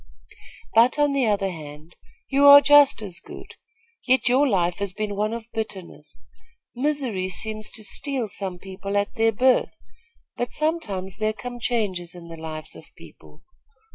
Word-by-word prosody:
"But, 235 +6 +4
on 290 -1 +3
the 270 -4 +1
other 200 -2 0
hand, 155 0 -11 0.3
you 280 +1 +4
are 285 0 +11
just 285 -5 +5
as 180 -4 -5
good; - - -12 0.5
yet 260 +1 +3
your 265 +4 +4
life 180 -5 0
has 200 -2 -2
been 210 0 -3
one 210 +2 -1
of 230 -1 -5
bitterness. 210 -5 -7 0.5
Misery 250 -9 -1
seems 215 +3 -4
to 220 - -6
steal 265 +1 -2
some 190 -3 -5
people 195 +2 -5
at 200 0 -1
their 225 -2 +2
birth; 255 +4 +2 0.6
but 245 0 -3
sometimes 210 - -2
there 215 0 0
come 245 +2 -8
changes 195 -8 -2
in 170 -1 -11
the 165 - -8
lives 155 -1 -6
of - - -13
people. - - -17
215 Hz, 160 wpm, -23 LUFS, 185-255 Hz, 0.6 s, are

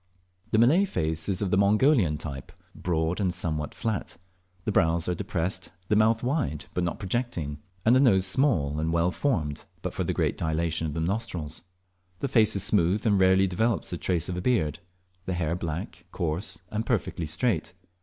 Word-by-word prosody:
The 110 - +2
Malay 145 - +5
face 80 - -2
is 95 +1 0
of 95 - -2
the 100 - +3
Mongolian 105 - +4
type, 70 -3 -7 0.2
broad 85 +2 -1
and 95 -2 +1
somewhat 80 -4 -3
flat. 110 -5 -3 0.5
The - - 0
brows 85 -3 +2
are 90 - +1
depressed, 95 -1 -2 0.2
the 105 - +3
mouth 110 +2 +3
wide, 125 - -1
but 90 - 0
not 85 - -2
projecting, 95 - -3 0.3
and 115 +3 +6
the - - +5
nose 100 -9 +4
small 95 - +1
and 80 +1 0
well 85 +2 +2
formed 80 - -1 0.2
but - - -3
for - - -1
the - - -1
great - - 0
dilatation 80 0 -1
of 75 - -5
the 80 - -1
nostrils. 85 -5 -3 0.6
The 140 - -2
face 115 -6 +3
is 100 - 0
smooth, 100 +1 +2
and 100 -3 +3
rarely 95 +1 +5
develops 110 +4 0
the 90 - -2
trace 85 -4 0
of 90 - -3
a 90 - -3
beard; 90 - +1 0.5
the 95 - 0
hair 85 -2 -1
black, 85 -2 -5
coarse, 85 +3 -2
and 110 +1 -1
perfectly 100 -8 -1
straight. 90 0 0
90 Hz, 185 wpm, -27 LUFS, 80-110 Hz, 0.6 s, and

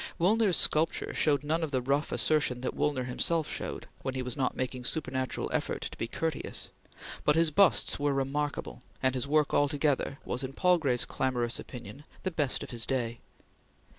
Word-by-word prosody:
Woolner's 200 +1 +3
sculpture 160 +2 +2
showed 145 -2 +2
none 160 +3 0
of 160 - -1
the 130 -2 0
rough 140 +4 0
assertion 150 -5 +2
that 130 - -2
Woolner 145 -4 0
himself 155 +5 +1
showed, - - -5
when 130 -1 -3
he 130 - -2
was 125 -1 -2
not 130 -2 -1
making 130 0 -3
supernatural 130 -2 0
effort - - -1
to - - -5
be 115 - -3
courteous, 160 +4 -3 0.5
but 150 - +4
his 165 -1 +4
busts 195 +3 +4
were 145 0 +1
remarkable, 140 0 -2 0.2
and 130 -1 +3
his 130 +1 -1
work 150 0 +2
altogether 145 -1 +1
was, 125 - -2
in 130 +1 -5
Palgrave's 155 -8 +2
clamorous 120 -3 -1
opinion, 125 +3 -9 0.2
the 185 - -1
best 145 -5 0
of - - -8
his 115 -2 -3
day. 120 -3 -1
140 Hz, 175 wpm, -30 LUFS, 130-155 Hz, 0.5 s, but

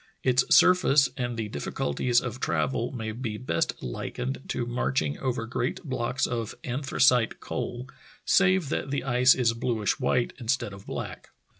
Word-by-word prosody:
Its 125 -1 +4
surface 150 -6 +5
and 120 -2 -3
the 110 -2 -2
difficulties 105 - 0
of 125 0 -5
travel 80 - -1
may 110 -4 -4
be 110 -1 -4
best 125 - -2
likened 125 - -4
to 120 - -2
marching 75 - -1
over 125 -3 -2
great 125 +6 -3
blocks 130 -3 -1
of 115 -3 -3
anthracite 130 -2 +2
coal, 125 +1 -5 0.4
save 190 -5 +3
that 135 - -2
the 140 0 -1
ice 125 0 +5
is 120 -3 +2
bluish 115 0 -1
white 125 -2 +1
instead 120 -4 -1
of 100 0 -12
black. - - -6
125 Hz, 150 wpm, -27 LUFS, 115-130 Hz, 0.4 s, surface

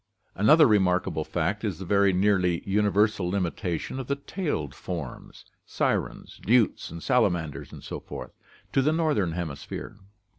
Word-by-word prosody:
Another 150 - +6
remarkable 90 -6 +2
fact 90 +7 -2
is 100 -7 -2
the 95 - -7
very 100 +1 +4
nearly 90 -2 +1
universal 105 -2 +2
limita 90 -3 -1
tion 130 - -6
of 130 - -5
the 140 - 0
tailed 140 - -3
forms 85 -8 -7
— - - -48
sirens, - - -2
newts, 115 -7 +2
salamanders, 75 -5 0
etc. - - -8 0.2
— - - -28
to 135 - +4
the 150 +3 +2
northern 150 - +1
hemisphere. 85 +4 -6
95 Hz, 140 wpm, -26 LUFS, 85-110 Hz, 0.2 s, Another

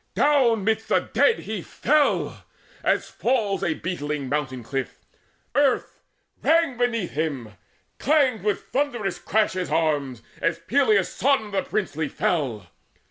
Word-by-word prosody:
Down 255 -8 +3
midst 220 +1 0
the - - +3
dead 465 - +2
He 215 -3 -4
fell, 295 - +1 0.4
as - - +1
fails 225 -6 0
a 155 - 0
beetling 150 -6 -3
mountain 135 -4 -2
cliff. 135 +2 -4 0.6
Earth 280 -2 +1 0.4
rang 325 -4 +3
beneath 230 -6 0
him: 145 -7 -3 0.5
clanged 275 -6 +2
with 210 -1 0
a 265 - -2
thundercrash 220 -6 0
His 185 -1 -3
arms, 145 -7 0 0.2
as 165 0 +1
Peleus' 210 +1 +2
son 260 -5 +1
the 195 - +1
princely 160 -8 -2
fell. 130 - -1
200 Hz, 130 wpm, -24 LUFS, 150-250 Hz, 0.6 s, Down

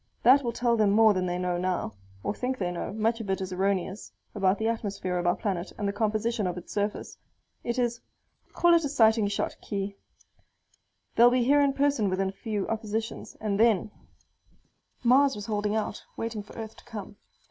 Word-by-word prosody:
That 260 +4 +7
will 240 - -1
tell 235 0 +1
them 215 -2 +4
more 215 +1 +6
than 185 -1 -1
they 175 0 -1
know 180 -1 -1
now 180 -11 -1 0.3
(or - - -1
think 255 +3 -2
they 180 -5 -1
know; 175 - -4
much 225 +2 0
of 205 - -7
it 190 - 0
is 185 -1 -4
erroneous) 190 +1 -1 0.2
about 195 -1 +2
the 220 - -1
atmosphere 200 -5 -2
of 175 - -1
our 175 - +3
planet 190 -4 -3
and 205 - -2
the 200 - -1
composition 215 0 0
of 180 - -3
its 180 - -8
surface. 205 0 -3 0.4
It 235 +1 -2
is 240 -1 0 0.5
call 345 0 +4
it 335 -1 +4
a 290 - -1
sighting 220 -5 +4
shot, 200 - -2
Khee. 200 0 -4 1.2
They'll 240 +1 +7
be 250 0 +2
here 285 +4 +4
in 280 -1 +3
person 275 -7 +2
within 190 +1 0
a 195 - -13
few 210 -4 -2
oppositions. 220 0 -4
And 210 -2 -1
then 215 -3 +3 0.6
" - - -39
Mars 265 +2 +5
was 205 -1 -6
holding 210 0 -1
out, 220 - -2
waiting 225 -2 -3
for 205 - -14
Earth 220 -1 -6
to - - -15
come. 205 -2 -8
215 Hz, 200 wpm, -28 LUFS, 195-235 Hz, 1.2 s, That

